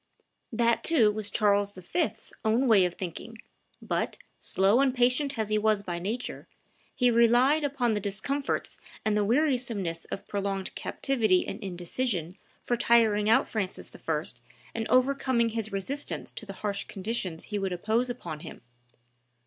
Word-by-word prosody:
That, 235 0 +2
too, 245 -11 +5
was 210 -1 -1
Charles 205 -1 +2
V.'s 190 - -3
own 225 +4 +2
way 205 -5 +6
of 175 - -3
thinking; 195 +5 -7 0.5
but, - - -2 0.2
slow 195 +5 +3
and 265 -2 +2
patient 250 +2 +2
as 220 -1 -1
he 215 0 +2
was 215 -1 +2
by 175 -3 -4
nature, 220 +8 -4 0.5
he 250 -1 +3
relied 240 +6 +4
upon 270 -5 0
the 210 - 0
discomforts 270 +8 -2 0.3
and 215 -1 +2
the 210 - +2
wearisomeness 235 - 0
of - - -7
prolonged 195 -1 -3
captivity 220 -9 +1
and 205 +3 -6
indecision 180 0 -2 0.3
for 240 - 0
tiring 220 -3 +3
out 225 - +4
Francis 200 -4 -3
I. - - -2 0.5
and 225 -1 -3
overcoming 255 -2 +2
his 220 -1 -3
resistance 230 +9 -2
to 220 - -6
the 195 - -6
harsh 200 -1 -1
conditions 190 -4 -3
he 210 -1 -3
would 195 -1 -2
impose 220 +7 0
upon 175 -11 -6
him. - - -10
220 Hz, 150 wpm, -28 LUFS, 195-245 Hz, 0.5 s, way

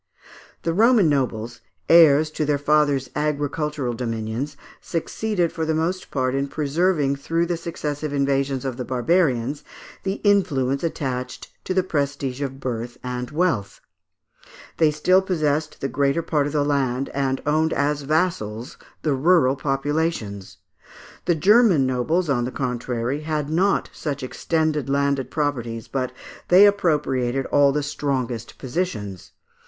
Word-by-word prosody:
The 165 - 0
Roman 220 -1 +5
nobles, 120 -5 -1 0.3
heirs 155 -2 +6
to 155 - -2
their 145 -1 +1
fathers' 145 -2 +2
agricultural 150 -2 -1
dominions, 115 +4 -4 0.2
succeeded 180 +1 -1
for 160 - -3
the 160 0 0
most 175 +4 -2
part 130 -2 -1
in 135 +1 0
preserving 150 0 0
through 165 +5 0
the 175 0 -1
successive 155 -3 -4
invasions 140 -1 0
of 130 -2 -3
the 125 - -3
barbarians, 135 0 +1 0.4
the 195 - -1
influence 150 -10 +2
attached 130 -6 -4
to 185 - -2
the 185 - +3
prestige 140 -5 -2
of 135 -1 -4
birth 120 -1 -4
and 125 -1 -4
wealth; 155 - -1 1.0
they 160 -2 +4
still 180 +5 +3
possessed 155 -5 -1
the 135 - 0
greater 140 +4 0
part 150 -3 0
of 145 - -5
the 145 -1 +1
land 135 -2 0
and 135 -1 -1
owned 155 +2 +2
as 145 +1 0
vassals 140 - -1 0.3
the 150 - +1
rural 140 -1 +3
populations. 135 - -2 0.7
The 175 - +2
Grerman 205 - +5
nobles, 130 +8 0
on 125 -4 +1
the 125 - -4
contrary, 125 +1 -2
had 155 -1 -2
not 190 +5 +1
such 145 -3 -4
extended 155 +1 -1
landed 140 -1 0
properties, 120 -7 -2
but 130 -2 -2 0.4
they 185 +3 +8
appropriated 145 -10 +1
all 140 -1 +5
the 150 +1 -1
strongest 130 -5 -3
positions. 125 - -4
145 Hz, 140 wpm, -23 LUFS, 130-160 Hz, 1.0 s, they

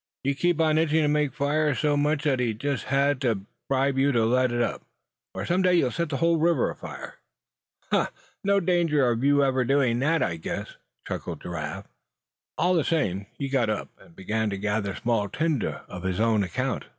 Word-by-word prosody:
"You 140 +1 +1
keep 175 +3 +1
on 155 -1 +3
itching 160 0 +2
to - - +2
make 150 -1 +1
fires 145 +1 0
so 150 -1 +2
much, 145 +1 +1
that 140 -4 +1
he 120 -3 0
just 140 +3 -2
had 140 0 +1
to 115 -7 0 0.3
bribe 135 0 +1
you 140 +1 +3
to 115 -2 +3
let 125 +2 +2
up, 120 0 -1 0.5
or - - -3
some 180 +2 +1
day 180 -1 +4
you'd 130 -8 +2
set 170 +5 -2
the 140 - -2
river 165 -2 +2
afire." - - -9 0.7
"Huh! - - +3 0.4
no 200 0 +3
danger 170 -7 +2
of 115 +2 -2
you 145 0 +4
ever 130 -1 +2
doing 125 -2 +2
that, 155 +2 +2
I 85 - -2
guess," 80 - -5 0.3
chuckled - - -5
Giraffe. 85 -4 -5 0.7
All 180 +1 +2
the 165 -4 +2
same, 100 - -1
he 140 - -3
got 130 -5 +1
up, 105 - -2
and 85 - -19
began 110 +3 -1
to 100 - -3
gather 105 0 -1
small 115 -4 0
tinder 155 -7 -1
on 90 - -8
his 95 0 -2
own 110 -1 +3
account. 90 - -2
135 Hz, 195 wpm, -26 LUFS, 115-155 Hz, 0.7 s, day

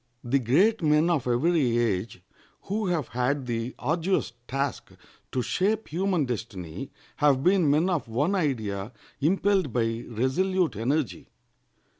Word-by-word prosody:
The 135 +3 +2
great 180 - +3
men 155 +2 +3
of 145 -7 0
every 125 -1 +2
age 105 -5 -1 0.4
who 210 +1 -2
have 170 -7 -1
had 125 +4 -1
the 115 0 -3
arduous 160 - 0
task 135 +1 -2 0.4
to 125 - -1
shape 210 - 0
human 180 -1 0
destiny 105 -3 -5 0.3
have 140 -3 +3
been 180 -3 +4
men 155 +5 +3
of 175 -8 -1
one 140 - 0
idea 110 - -1 0.3
impelled 190 +1 +2
by 115 0 -1
resolute 160 - 0
energy. 130 +5 -1
140 Hz, 130 wpm, -26 LUFS, 120-175 Hz, 0.4 s, been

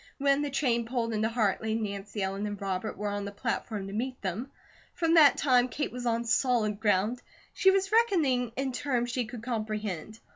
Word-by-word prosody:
When 280 0 +2
the 290 - -1
train 240 -4 0
pulled 230 -2 -1
into 220 +1 +1
Hartley, 220 -1 0
Nancy 205 -1 -3
Ellen 195 +2 -2
and 205 -1 -5
Robert 195 +1 -3
were 205 +1 -2
on 205 0 -3
the 200 - -5
platform 215 -1 -3
to 195 - -7
meet 255 +4 -3
them. 200 +8 -3 0.5
From 330 -1 +1
that 310 -4 +7
time, 250 -3 +4
Kate 290 +5 -3
was 245 0 -4
on 230 0 0
solid 230 -4 +1
ground. 215 +3 +1 0.3
She 385 - +4
was 390 +1 +2
reckoning 320 - +2
in 270 0 -1
terms 245 -2 -1
she 250 -1 -1
could 230 0 -9
comprehend. 215 -4 -4
230 Hz, 190 wpm, -29 LUFS, 210-260 Hz, 0.5 s, that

